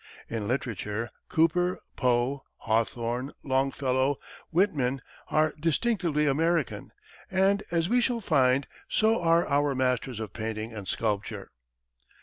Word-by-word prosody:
In 110 -3 -3
literature, 115 -3 -2 0.2
Cooper, 175 +3 +2 0.2
Poe, 125 +2 +1 0.2
Hawthorne, 115 +4 -1
Longfellow, 135 0 +1 0.3
Whitman 145 -8 +1 0.2
are 155 0 +2
distinctively 165 -1 +1
American; 160 +1 0 0.4
and, 195 +2 +3
as 170 -1 +1
we 245 +4 +3
shall 240 -1 +1
find, 135 - +3 0.2
so 220 -1 +3
are 170 0 +3
our 145 -1 +2
masters 125 -2 0
of 110 -5 -5
painting 110 0 -4
and 105 -3 -7
sculpture. 105 0 -2
135 Hz, 115 wpm, -28 LUFS, 120-165 Hz, 0.4 s, and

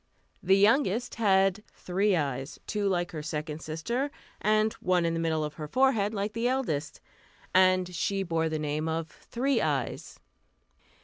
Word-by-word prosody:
The 190 +2 +4
youngest 225 +2 +3
had 195 0 +3
three 195 +2 +1
eyes, 135 -3 -3
two 205 -1 -1
like 175 -2 0
her 155 - -5
second 155 0 -4
sister, 235 - -2 0.3
and 215 +1 +2
one 180 -2 +2
in 165 - +1
the 165 - -1
middle 160 -1 0
of 150 0 -4
her 155 -1 -7
forehead, 225 - +2
like 205 0 -3
the 230 +2 0
eldest, 230 - -2 0.5
and 185 -1 +4
she 195 +3 -1
bore 165 -2 0
the 155 - -2
name 155 +1 -2
of 160 0 -3
"Three 255 0 -1
Eyes." 140 -5 -2
185 Hz, 160 wpm, -28 LUFS, 160-215 Hz, 0.5 s, The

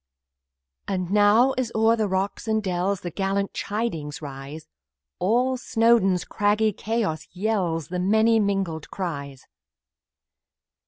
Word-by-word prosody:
And 185 -2 -2
now, 210 +5 +5
as 240 -3 -2
over 220 -1 +3
rocks 190 +3 -2
and 220 -1 +1
dells, 185 +1 -1
The 175 - -5
gallant 195 +2 -1
chidings 185 -9 -3
rise, 140 +1 -8 0.5
All 245 +7 +2
Snowdon's 225 -6 +2
craggy 210 +1 +1
chaos 205 -7 -2
yells 180 -5 -1
With 180 0 -1
many 220 +4 +3
mingled 195 -6 -1
cries. 140 -8 -5
200 Hz, 110 wpm, -24 LUFS, 175-220 Hz, 0.5 s, now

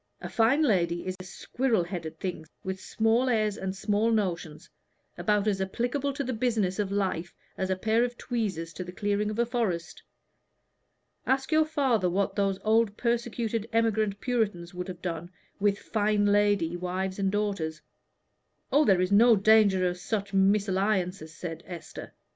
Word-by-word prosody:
"A - - -7
fine 245 +7 +3
lady 175 - +1
is 185 0 -3
a - - -7
squirrel 225 +2 -1
headed 165 -3 -6
thing, 175 -4 -4 0.2
with 190 0 -4
small 225 +3 +1
airs, 215 -3 +1
and 190 -1 -4
small 210 +3 +1
notions, 175 -8 -2 0.5
about 210 -1 +1
as 195 -2 +1
applicable 245 +8 -1
to 280 - -3
the 255 -1 -3
business 220 -5 0
of 200 -2 -1
life 190 -4 -2 0.2
as 190 - -2
a 190 - +1
pair 220 +5 +2
of 245 0 -3
tweezers 195 -9 -3
to 185 - -5
the 180 - -8
clearing 205 +2 -1
of 215 - -4
a 235 - +3
forest. 220 -9 -2 1.3
Ask 265 +2 +1
your 310 0 +4
father 265 - +1
what 195 +2 0
those 195 -2 +1
old 220 -1 +2
persecuted 235 -2 -1
emigrant 220 -3 +1
Puritans 210 -9 -1
would 180 +1 -5
have 180 -2 -8
done 175 -1 -4 0.3
with 200 0 +2
fine 210 -1 0
lady 205 -4 +2
wives 185 +2 -3
and 195 -1 +1
daughters." 195 -7 -2 0.9
"Oh, 290 +3 +4
there 190 -6 +4
is 185 +1 0
no 225 +3 +7
danger 200 -3 +4
of 180 0 -3
such 200 0 -3
mésalliances," 195 -3 +1
said 165 +1 -7
Esther. 170 -3 -8
200 Hz, 165 wpm, -28 LUFS, 185-225 Hz, 1.3 s, no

